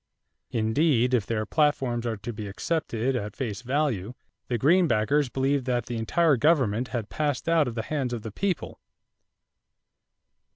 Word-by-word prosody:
Indeed, 125 +2 +2
if 115 -5 +2
their 110 -2 -1
platforms 130 -6 +1
are 115 -2 -2
to 110 +4 -6
be 105 -1 -6
accepted 130 +2 -1
at 105 -3 -4
face 115 -5 -4
value, 125 -5 -1 0.3
the 120 - 0
Greenbackers 145 - +3
believed 135 0 0
that 120 -3 0
the 120 - -4
entire 145 +6 +2
government 130 -5 +2
had 115 -5 -4
passed 145 -3 -2
out 165 -4 +3
of 120 - -4
the 110 - -2
hands 135 -1 -2
of 120 -3 -4
the 110 - -6
people. 185 - -3
125 Hz, 155 wpm, -26 LUFS, 110-145 Hz, 0.3 s, Greenbackers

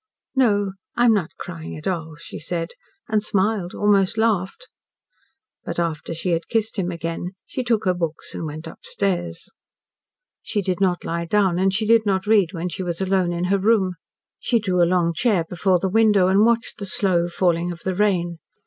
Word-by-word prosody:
"No, 205 -6 +3 0.3
I 240 - +4
am 230 - +6
not 190 -3 -2
crying 165 -4 -7
at 155 - -10
all," 160 -4 -3
she 165 - -9
said, 165 +1 -3 0.4
and 215 -1 +1
smiled 200 -3 0
almost 205 0 +2
laughed. 220 - 0 1.0
But 170 - -5
after 165 -1 -2
she 175 +2 -2
had 165 0 -1
kissed 225 -2 0
him 180 -2 -1
again 170 +2 -4
she 255 - -4
took 230 -3 +1
her 185 - +3
books 165 -3 -4
and 160 - -4
went 155 +2 -7
upstairs. 175 0 -3 0.9
She 205 -2 -2
did 185 0 -2
not 180 -2 +1
lie 170 0 -2
down, 190 -1 +2
and 190 +1 +3
she 215 +3 0
did 230 0 +5
not 195 -2 0
read 205 -5 +4
when 175 -1 -3
she 175 - -5
was 175 -2 -2
alone 190 -2 +1
in 175 0 -2
her 200 - +3
room. 195 -2 +2 0.5
She 240 - +1
drew 185 -4 +1
a 170 - +4
long 175 -2 +2
chair 190 -1 +1
before 180 +2 +2
the 190 - -1
window 205 -2 +4
and 195 +2 +4
watched 235 +1 +1
the 200 - -4
slow 180 -3 +1
falling 175 0 0
of 170 - -9
the 190 - -1
rain. 180 -4 +1
185 Hz, 195 wpm, -22 LUFS, 170-210 Hz, 1.0 s, am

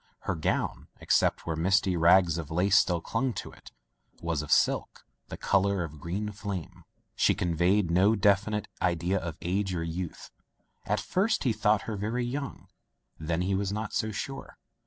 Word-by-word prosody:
Her 100 - -2
gown, 80 -3 -2
except - - +1
where 80 - -2
misty 95 +3 +2
rags 85 0 +4
of 75 -4 -6
lace 90 +4 +2
still 85 -4 +3
clung 130 +8 -1
to 95 - -6
it, - - -15 0.5
was 85 -3 -1
of 75 - -7
silk, - - +1 0.2
the - - -7
color 100 -1 +1
of 75 -2 -8
green 95 +7 -3
flame. 95 -4 -6 0.3
She - - +3
conveyed 90 +2 +1
no 95 +6 +4
definite 105 +1 +2
idea 90 +2 +1
of 85 -2 -6
age 95 +2 -1
or 85 - -2
youth. 85 +1 -5 0.6
At 105 +1 +1
first 200 - 0
he 125 -5 +2
thought 105 -1 +2
her 110 -2 -4
very 115 +5 -2
young, 140 +3 -5 0.5
then 80 +2 -1
he 95 +2 0
was 95 0 0
not 105 +1 -4
so 110 - -1
sure. 135 +6 -6
95 Hz, 170 wpm, -28 LUFS, 85-105 Hz, 0.6 s, rags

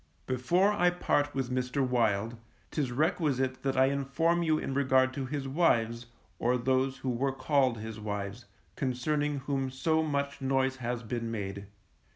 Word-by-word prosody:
Before 170 +11 +2
I 180 -3 +4
part 145 -4 0
with 130 -2 -2
Mr. 130 +1 0
Wild, 115 -2 +1 0.4
'tis 140 -5 -1
requisite 130 -2 0
that 135 -1 -1
I 130 - +6
inform 140 +5 +1
you 160 -2 +2
in 135 - -3
regard 130 -1 +3
to 135 -1 -3
his 140 0 -3
wives, 120 -6 +1 0.3
or 125 +2 +2
those 130 +2 +1
who 130 - -3
were 135 +3 0
called 130 -2 +2
his 110 0 -7
wives, 105 +2 -4 0.3
concerning 145 +3 -1
whom 135 -1 -1
so 160 +5 +1
much 140 -2 -2
noise 135 0 +1
has 120 -1 -3
been 115 0 -3
made. 100 -3 -5
130 Hz, 160 wpm, -30 LUFS, 120-140 Hz, 0.4 s, I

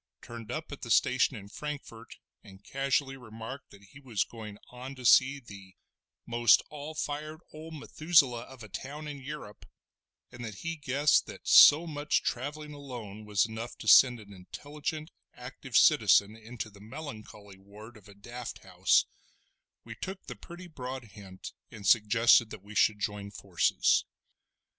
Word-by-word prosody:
turned 115 -2 -9
up 155 0 -5
at 145 - -8
the 120 - -7
station 130 +4 +3
at 100 0 -11
Frankfort, 140 -6 -8 0.3
and 95 -2 -15
casually 135 +1 -1
remarked 115 +2 -9
that 100 0 -17
he 100 +9 -16
was 120 -8 -1
going 110 -3 -10
on 130 +2 -8
to 130 -2 -10
see 135 +3 +5
the 100 -6 -13 0.5
most 120 0 +4
all 150 +1 -8
fired 155 +1 -4
old 160 +1 -9
Methuselah 145 -5 +2
of 130 -3 -13
a - - -9
town 145 +8 -7
in 145 -2 -7
Yurrup, 135 -7 -9 0.7
and 120 0 -9
that 110 -3 -6
he 165 0 -2
guessed 145 0 +2
that - - -11
so 155 +4 +8
much 150 -2 -1
travelling 150 +4 -4
alone 120 -7 -9
was 105 -1 +2
enough 115 +1 -7
to - - -9
send 125 -2 +7
an 100 -2 -13
intelligent, 150 - -6 0.2
active 125 0 -3
citizen 105 -7 +5
into 110 0 -8
the 100 -1 -16
melancholy 110 -5 -10
ward 105 +4 -14
of 105 -2 -16
a 100 - -15
daft 120 +4 -8
house, - - +2 0.8
we - - -9
took 190 +1 -7
the - - -7
pretty 175 +1 -11
broad 130 -6 -7
hint 95 -2 -11 0.2
and 105 -2 -11
suggested 115 +1 +5
that 95 - -10
we 105 +1 -12
should 105 +1 +3
join 105 0 -4
forces. 95 -4 +1
120 Hz, 160 wpm, -29 LUFS, 105-145 Hz, 0.8 s, so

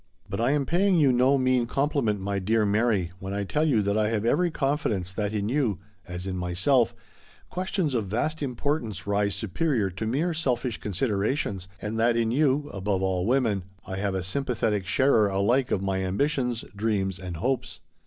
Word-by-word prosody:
But - - -3
I 120 - +2
am 145 -1 +1
paying 185 +3 +2
you 140 -4 +5
no 130 +3 +4
mean 130 -2 +2
compliment, 135 -6 0
my 100 +1 -2
dear 110 +3 +2
Mary, 105 -4 +1
when 95 +1 -5
I 100 - -1
tell 150 +10 0
you 115 -8 +3
that 100 +1 0
I 105 -1 +2
have 110 -1 -1
every 175 +9 +3
con 140 -3 0
fidence 95 - -2
that 105 0 -2
in 105 -1 -1
you, 120 -6 +1 0.3
as 90 0 -6
in 95 -1 -3
myself, 95 +8 +2 0.6
questions 185 -4 -1
of 110 -5 -1
vast 150 +10 -1
importance 125 - -2
rise 100 0 +1
superior 110 - 0
to 95 +5 -4
mere 155 +9 0
selfish 125 -7 -1
considerations, 100 - -1
and 110 +2 -3
that 115 +1 +3
in 115 -1 +1
you, 145 +2 +2
above 95 -1 -1
all 95 0 0
women, 120 -6 +2 0.2
I 95 - -5
have 100 -1 -1
a 95 - -2
sympathetic 105 -2 -1
sharer 115 -1 +4
alike 115 +7 +2
of 95 - 0
my 95 -1 -1
ambitions, 125 +4 0
dreams, 100 -3 -1
and 90 -3 -6
hopes. 130 +9 -2
110 Hz, 185 wpm, -26 LUFS, 100-135 Hz, 0.6 s, you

